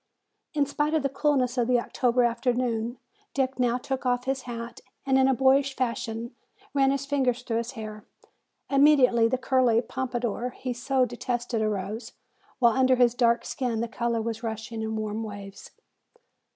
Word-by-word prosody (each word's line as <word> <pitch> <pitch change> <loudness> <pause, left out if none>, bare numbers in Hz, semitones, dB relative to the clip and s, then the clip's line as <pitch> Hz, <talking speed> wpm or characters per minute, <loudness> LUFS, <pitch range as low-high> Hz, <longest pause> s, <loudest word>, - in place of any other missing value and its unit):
In 290 -1 +3
spite 295 +2 -1
of 310 - +1
the 275 - +1
coolness 270 -3 +1
of 235 - +2
the 250 -1 +3
October 245 +1 +1
afternoon 240 -1 0 0.4
Dick 265 -1 0
now 245 -1 +2
took 265 +1 -4
off 245 -1 +1
his 265 0 -1
hat 235 0 -6 0.2
and 270 -1 +2
in 265 0 +5
a 265 - +3
boyish 270 +1 +3
fashion 235 -2 -3 0.4
ran 270 -1 +3
his 275 0 -1
fingers 260 -3 0
through 230 -2 -1
his 235 +3 -3
hair. 215 -3 -7 0.6
Immediately 275 -5 +5
the 255 - 0
curly 255 -3 +3
pompadour 245 -1 -3
he 255 -1 -3
so 255 +1 +1
detested 240 -1 -3
arose, 215 +2 -3 0.4
while 235 -3 +4
under 260 +1 +4
his 245 -2 +4
dark 235 -1 +2
skin 245 -4 -2
the 235 - -1
color 235 -1 -1
was 225 0 -4
rushing 225 0 -5
in 220 0 -3
warm 215 0 -3
waves. 205 -2 -8
245 Hz, 165 wpm, -26 LUFS, 230-265 Hz, 0.6 s, in